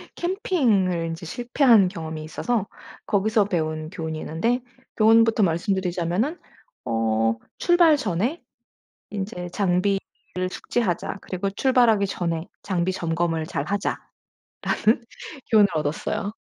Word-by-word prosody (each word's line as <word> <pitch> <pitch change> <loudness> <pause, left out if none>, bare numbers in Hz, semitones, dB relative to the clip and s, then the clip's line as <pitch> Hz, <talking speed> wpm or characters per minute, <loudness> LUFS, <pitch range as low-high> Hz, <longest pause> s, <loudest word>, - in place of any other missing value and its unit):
캠핑을 240 - +1
인제 165 +1 -5
실패한 240 - +4
경험이 160 -3 -6
있어서 205 +7 -2 0.4
거기서 210 +1 +2
배운 155 -4 -2
교훈이 160 -3 -5
있는데 230 +12 -1 0.4
교훈부터 225 0 +5
말씀드리자면은 185 - 0 0.5
어 115 0 +1 0.2
'출발 345 -4 +5
전에 225 - -1 0.7
인제 190 -3 -4
장비를 195 +1 +1 0.5
숙지하자. 195 -2 -2
그리고 190 +1 -3
출발하기 230 -2 +3
전에 170 -3 -2 0.2
장비 185 -2 0
점검을 165 -2 -1
잘하자.'라는 190 +8 -3 1.3
교훈을 210 -2 +6
얻었어요. 155 +6 -2
190 Hz, 275 characters per minute, -24 LUFS, 165-225 Hz, 1.3 s, 교훈을